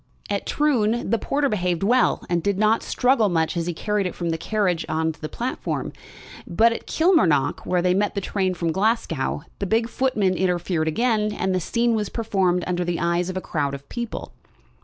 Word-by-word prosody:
At - - -2
Troon 240 -7 +1
the 230 - +2
porter 285 +5 0
behaved 180 -6 -1
well, 245 +5 +3
and 170 -1 0
did 200 +2 0
not 215 +2 +3
struggle 250 -4 +2
much 165 -2 0
as 170 0 -2
he 175 - -1
carried 210 +1 -1
it 180 - -6
from 170 -2 -2
the 165 - -1
carriage 185 -4 0
on 160 +1 0
to 160 - -16
the 155 - -4
platform. 245 +2 -3 0.5
But 230 +6 +3
at - - -8
Kilmarnock, 250 - +2
where 180 -1 +1
they 180 0 +3
met 205 +3 0
the - - 0
train 190 -1 -1
from 170 -2 -1
Glasgow, 180 - 0 0.2
the 200 - -2
big 225 +3 +2
footman 230 -7 +1
interfered 175 -3 0
again, 215 +4 +1
and 190 -2 -1
the 185 - +1
scene 235 +6 +1
was 210 -2 -1
performed 190 -6 0
under 180 0 -1
the 175 -1 -2
eyes 170 +1 0
of 185 - -4
a - - -2
crowd 145 -5 -2
of 140 0 -12
people. 235 -2 -5
190 Hz, 200 wpm, -23 LUFS, 170-225 Hz, 0.5 s, well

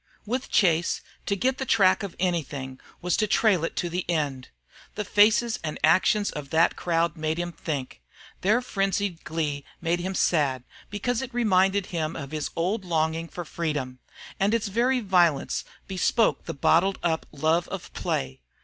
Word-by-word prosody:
With 255 +5 -3
Chase, 170 -3 +2 0.3
to 200 - +1
get 255 +6 0
the - - -1
track 195 -6 +4
of 200 -4 -6
anything, 145 -7 -2 0.2
was 180 -1 +1
to 215 - +1
trail 200 -5 +3
it 165 - -2
to 175 - -1
the 175 +1 -2
end. 145 -6 -1 0.5
The 210 - -3
faces 220 +4 +4
and 155 -2 -3
actions 195 +6 +4
of 145 -2 -7
that 160 +3 +3
crowd 170 -1 0
made 155 0 -2
him 175 0 -2
think; 140 - -5 0.4
their 215 +6 +3
frenzied 195 -4 -1
glee 150 -3 -2 0.2
made 170 +1 0
him 185 +2 -3
sad, 140 -9 +1 0.3
because 225 +4 -1
it 265 -1 -6
reminded 195 -4 +3
him 160 -1 -2
of 140 0 -6
his 155 -2 -3
old 190 +5 -1
longing 165 -1 0
for 175 +1 -7
freedom, 145 -6 -3 0.4
and 200 +3 +3
its 220 -2 -1
very 245 +5 +2
violence 175 -8 +2 0.2
bespoke 195 +4 +1
the - - -5
bottled 175 +7 +3
up 165 -2 0
love 160 +4 +1
of 195 -1 -7
play. 65 -1 -3
175 Hz, 165 wpm, -26 LUFS, 155-200 Hz, 0.5 s, track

